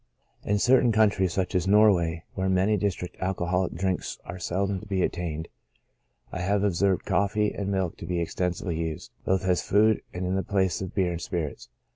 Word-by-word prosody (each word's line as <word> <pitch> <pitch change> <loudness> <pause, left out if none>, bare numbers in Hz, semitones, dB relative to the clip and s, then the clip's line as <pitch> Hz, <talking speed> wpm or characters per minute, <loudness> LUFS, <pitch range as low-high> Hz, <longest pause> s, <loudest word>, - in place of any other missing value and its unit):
In 105 - +1
certain 125 +2 +4
coun 110 -1 +4
tries, 95 -2 0
such 95 +2 -1
as 90 0 +1
Norway, 95 -6 +4
where 95 0 -1
in 95 - +2
many 100 +4 +3
districts 95 -3 -3
alcoholic 90 -1 -1
drinks 95 +1 -2
are 90 +1 -7
seldom 95 +2 -1
to 110 - -12
be 95 -2 0
obtained, 80 -2 -4 0.8
I 95 - -4
have 100 +2 +1
observed 95 -1 +1
coffee 105 +1 +1
and 100 -1 -3
milk 95 -3 -1
to - - -8
be 90 0 -1
extensively 85 0 -2
used, 80 -2 -4
both 95 0 +1
as 90 -2 +2
food 110 +1 +3
and 90 0 -4
in 90 - -1
the 95 - +1
place 95 0 0
of 95 - -6
beer 95 -3 +2
and 85 0 -4
spirits. 85 -6 -4
95 Hz, 195 wpm, -26 LUFS, 90-100 Hz, 0.8 s, certain